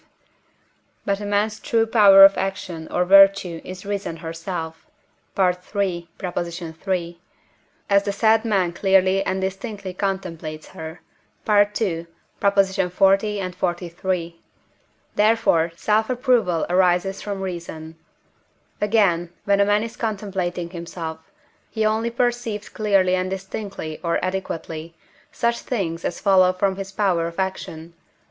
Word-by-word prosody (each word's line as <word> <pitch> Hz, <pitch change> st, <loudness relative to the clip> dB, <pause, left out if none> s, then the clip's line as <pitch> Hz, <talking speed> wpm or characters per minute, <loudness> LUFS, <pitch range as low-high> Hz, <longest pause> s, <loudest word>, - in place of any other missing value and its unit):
But 200 Hz, 0 st, 0 dB
a 205 Hz, -, -5 dB
man's 210 Hz, +1 st, 0 dB
true 225 Hz, 0 st, +1 dB
power 200 Hz, -4 st, +8 dB
of 195 Hz, -, +5 dB
action 185 Hz, -4 st, -4 dB
or 180 Hz, -, +1 dB
virtue 195 Hz, -3 st, +5 dB
is 185 Hz, +1 st, -9 dB
reason 200 Hz, -5 st, -3 dB
herself 165 Hz, 0 st, -6 dB, 0.5 s
(III. 180 Hz, -2 st, +2 dB, 1.3 s
iii.), 175 Hz, -2 st, -2 dB, 0.7 s
as 200 Hz, 0 st, +4 dB
the 200 Hz, -, -1 dB
said 220 Hz, +2 st, +3 dB
man 195 Hz, -6 st, +1 dB
clearly 190 Hz, +1 st, +3 dB
and 190 Hz, 0 st, -1 dB
distinctly 195 Hz, 0 st, -4 dB
contemplates 170 Hz, -5 st, -4 dB
her 160 Hz, +1 st, -9 dB, 0.5 s
(II. 205 Hz, -5 st, +2 dB, 0.3 s
xl. 195 Hz, -2 st, +2 dB
xliii.); 185 Hz, -3 st, 0 dB, 0.8 s
therefore 210 Hz, -6 st, +3 dB
self 215 Hz, +5 st, +1 dB
approval 245 Hz, -, +1 dB
arises 180 Hz, +2 st, +2 dB
from 200 Hz, -2 st, -4 dB
reason. 170 Hz, -3 st, -6 dB, 0.9 s
Again, 200 Hz, -5 st, +2 dB, 0.2 s
when 200 Hz, 0 st, +3 dB
a 200 Hz, -, +5 dB
man 205 Hz, +1 st, +2 dB
is 230 Hz, 0 st, -6 dB
contemplating 190 Hz, -5 st, -3 dB
himself, 165 Hz, -2 st, -7 dB, 0.4 s
he 220 Hz, -1 st, -1 dB
only 220 Hz, +2 st, +1 dB
perceived 235 Hz, -3 st, -2 dB
clearly 195 Hz, -4 st, +2 dB
and 185 Hz, 0 st, 0 dB
distinctly 190 Hz, -4 st, -6 dB
or 170 Hz, -1 st, 0 dB
adequately, 165 Hz, -3 st, -5 dB, 0.4 s
such 235 Hz, 0 st, 0 dB
things 175 Hz, -8 st, -3 dB
as 175 Hz, -, -3 dB
follow 190 Hz, -2 st, +4 dB
from 190 Hz, +1 st, 0 dB
his 195 Hz, 0 st, -6 dB
power 185 Hz, -5 st, +1 dB
of 170 Hz, -, -9 dB
action 170 Hz, -3 st, -4 dB
(III. -, -, -39 dB
190 Hz, 120 wpm, -22 LUFS, 175-205 Hz, 1.3 s, power